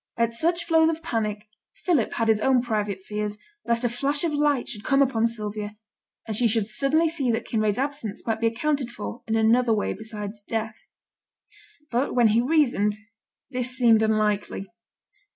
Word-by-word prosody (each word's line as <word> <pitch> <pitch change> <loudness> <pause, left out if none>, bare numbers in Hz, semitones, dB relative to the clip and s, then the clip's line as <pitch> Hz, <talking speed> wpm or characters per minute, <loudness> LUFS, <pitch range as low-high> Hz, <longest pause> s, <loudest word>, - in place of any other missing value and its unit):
At 230 0 +1
such 340 +7 +1
flows 325 -1 +4
of 325 0 -3
panic, 215 -6 -2 0.4
Philip 330 - +2
had 230 - 0
his 220 -1 +4
own 255 -1 +3
private 210 -5 -2
fears 210 0 -4 0.3
lest 235 +1 +1
a 240 - +2
flash 280 +5 0
of 330 -3 0
light 290 -3 +1
should 210 -1 -5
come 275 +3 +2
upon 235 -5 +3
Sylvia, 210 -2 -5 0.5
and 220 - -3
she 235 +2 +4
should 220 -1 +1
suddenly 275 +9 +2
see 305 -6 -1
that 225 - 0
Kinraid's 215 -2 0
absence 265 -6 -3
might 225 -1 -1
be 230 - +3
accounted 270 +3 -1
for 240 0 -7
in 225 - 0
another 225 +2 +3
way 210 - 0
besides 210 0 -6
death. 220 +1 -3 1.2
But 245 +4 0
when 240 -3 +5
he 225 +2 +3
reasoned, 245 -8 +2 0.6
this 250 -1 -1
seemed 230 -3 +5
unlikely. 215 -2 0
230 Hz, 170 wpm, -25 LUFS, 215-270 Hz, 1.2 s, when